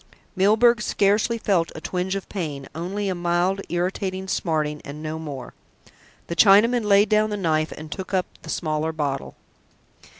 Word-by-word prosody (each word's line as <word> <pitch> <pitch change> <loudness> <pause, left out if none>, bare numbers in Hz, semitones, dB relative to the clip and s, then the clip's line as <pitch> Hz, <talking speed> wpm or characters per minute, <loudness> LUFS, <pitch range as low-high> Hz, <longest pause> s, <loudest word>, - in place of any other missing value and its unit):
Milburgh 220 +4 +4
scarcely 210 +3 +2
felt 190 -7 +1
a - - -5
twinge 180 +3 -2
of 195 - -5
pain, 150 -8 -5
only 190 +6 -3
a 190 - 0
mild 175 +2 0
irritating 185 +2 -2
smarting 155 -5 -1
and 150 +2 -8
no 155 +1 -4
more. 145 -5 -7 0.7
The 170 - -5
Chinaman 220 +5 +5
laid 205 0 +5
down 215 0 +3
the 210 - -2
knife 155 -4 0
and 155 0 -9
took 190 -2 -6
up 185 -2 +1 0.2
the - - -11
smaller 155 0 -1
bottle. 145 -3 -3
180 Hz, 160 wpm, -23 LUFS, 155-200 Hz, 0.7 s, Chinaman